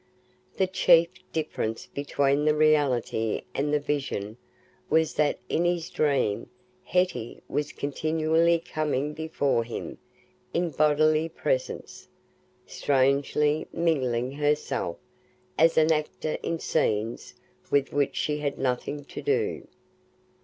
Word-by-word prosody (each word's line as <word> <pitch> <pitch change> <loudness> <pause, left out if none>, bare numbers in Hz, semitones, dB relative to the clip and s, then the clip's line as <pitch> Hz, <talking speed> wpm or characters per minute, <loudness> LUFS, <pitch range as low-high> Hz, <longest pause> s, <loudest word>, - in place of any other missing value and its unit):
The 190 - +3
chief 175 -2 +5 0.2
difference 150 -8 -3
between 140 0 0
the 150 0 +4
reality 140 -8 +2
and 145 +2 -1
the 150 - +3
vision 135 -8 -3 0.5
was 160 0 +2
that 150 -1 +1
in 170 - +1
his 175 -1 0
dream 140 -9 0 0.3
Hetty 180 -10 -1
was 145 +1 -2
continually 160 +3 +1
coming 150 -3 -2
before 150 -6 0
him 115 - -7 0.6
in 175 -1 +1
bodily 155 +2 +3
presence—strangely 145 - -1
mingling 130 -7 0
herself 145 - -1 0.6
as 165 +1 +4
an 160 0 +5
actor 155 0 -1
in 165 - -2
scenes 115 -9 -1 0.3
with 140 -1 +1
which 140 -1 +1
she 150 0 -1
had 145 -1 -2
nothing 135 +3 -2
to - - -7
do. 430 0 -1
150 Hz, 110 wpm, -27 LUFS, 140-160 Hz, 0.6 s, chief